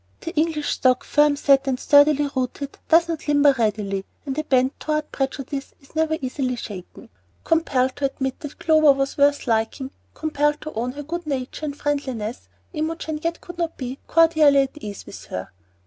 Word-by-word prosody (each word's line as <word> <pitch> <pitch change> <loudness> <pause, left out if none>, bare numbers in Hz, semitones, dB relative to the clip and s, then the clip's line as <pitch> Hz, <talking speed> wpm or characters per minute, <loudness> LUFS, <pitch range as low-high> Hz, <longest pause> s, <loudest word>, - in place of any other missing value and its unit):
The 330 - -5
English 310 -1 0
stock, 255 -1 +2
firm 295 -1 +3
set 275 -1 +3
and 255 -2 0
sturdily 290 0 +5
rooted, 260 +2 -3
does 335 +1 +5
not 325 -2 -4
"limber" 285 -1 +5
readily, 205 -3 0 0.2
and 270 -2 -3
a 310 - -1
bent 260 -2 +1
toward 305 0 -2
prejudice 275 0 -4
is 275 - -23
never 315 0 +1
easily 255 -1 -2
shaken. 200 -6 -9 0.3
Compelled 265 -6 +1
to 285 - 0
admit 265 -1 -3
that 295 -1 -8
Clover 310 -3 +5
was 275 0 -2
worth 285 0 +3
liking, 230 +3 -1 0.2
compelled 295 -1 0
to 310 - -7
own 245 +3 -2
her 290 +1 -7
good 340 +2 -5
nature 270 +1 -3
and 285 0 -5
friendliness, 260 -7 -3 0.2
Imogen 315 -1 -3
yet 335 +1 -2
could 350 0 -10
not 335 -1 -2
be 255 +1 -5
cordially 315 -4 +5
at 270 +2 -4
ease 205 -8 -8
with 100 -1 -10
her. 90 -2 -6
285 Hz, 180 wpm, -23 LUFS, 255-310 Hz, 0.3 s, sturdily